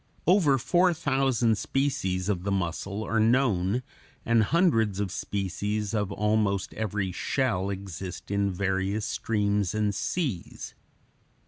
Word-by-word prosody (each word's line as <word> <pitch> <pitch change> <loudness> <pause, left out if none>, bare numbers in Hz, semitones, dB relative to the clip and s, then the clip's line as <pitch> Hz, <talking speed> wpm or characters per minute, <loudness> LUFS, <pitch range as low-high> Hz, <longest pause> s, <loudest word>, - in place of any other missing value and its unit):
Over 170 -7 +4
four 175 +6 +3
thousand 135 -7 +1
species 95 -10 -1
of 100 -4 0
the 100 - -1
mussel 100 +3 -2
are 115 +1 0
known, 115 -2 +2 0.4
and 115 -1 +4
hundreds 115 - +2
of 100 -3 -1
species 100 +2 -2
of 105 -3 -1
almost 105 -1 0
every 105 -3 -2
shell 100 -2 -1
exist 95 -1 -6
in 100 0 +1
various 95 +2 -1
streams 105 -3 0
and 105 -1 +1
seas. 110 - -3
105 Hz, 120 wpm, -27 LUFS, 95-120 Hz, 0.4 s, Over